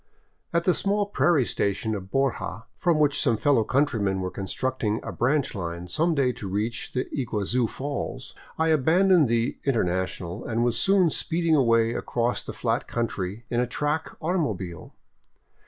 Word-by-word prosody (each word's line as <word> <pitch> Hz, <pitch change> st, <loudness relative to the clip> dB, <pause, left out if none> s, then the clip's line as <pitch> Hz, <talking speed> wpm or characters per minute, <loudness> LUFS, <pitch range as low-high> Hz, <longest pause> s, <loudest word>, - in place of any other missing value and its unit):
At 170 Hz, -1 st, +1 dB
the 180 Hz, -, +3 dB
small 205 Hz, +2 st, +1 dB
prairie 175 Hz, -8 st, +2 dB
station 100 Hz, +2 st, -1 dB
of 95 Hz, -2 st, -5 dB
Borja, 115 Hz, -4 st, -1 dB
from 170 Hz, -3 st, +2 dB
which 145 Hz, -2 st, +3 dB
some 120 Hz, -7 st, +2 dB
fellow 135 Hz, -1 st, +3 dB
coun 140 Hz, +6 st, +3 dB
trymen 100 Hz, -8 st, -1 dB
were 95 Hz, 0 st, -3 dB
constructing 110 Hz, +2 st, -2 dB
a -, -, -5 dB
branch 135 Hz, +3 st, +1 dB
line 85 Hz, -2 st, -5 dB
some 165 Hz, -, +1 dB
day 135 Hz, -3 st, +2 dB
to 110 Hz, -4 st, -7 dB
reach 110 Hz, +5 st, -2 dB
the 125 Hz, -, -1 dB
Iguazu 120 Hz, -2 st, 0 dB
Falls, 130 Hz, -2 st, -5 dB, 0.2 s
I 160 Hz, 0 st, +2 dB
abandoned 165 Hz, +2 st, +4 dB
the 115 Hz, +2 st, 0 dB
International," 95 Hz, -7 st, -1 dB
and 115 Hz, 0 st, -1 dB
was 120 Hz, -1 st, +1 dB
soon 190 Hz, -2 st, +4 dB
speeding 165 Hz, +1 st, +1 dB
away 115 Hz, -4 st, +3 dB
across 120 Hz, 0 st, -1 dB
the -, -, -7 dB
flat -, -, -1 dB
country 110 Hz, -2 st, -3 dB
in 120 Hz, -, +1 dB
a 125 Hz, -, +1 dB
track 150 Hz, +5 st, -1 dB
automobile. 110 Hz, -, -3 dB
125 Hz, 160 wpm, -26 LUFS, 105-155 Hz, 0.2 s, abandoned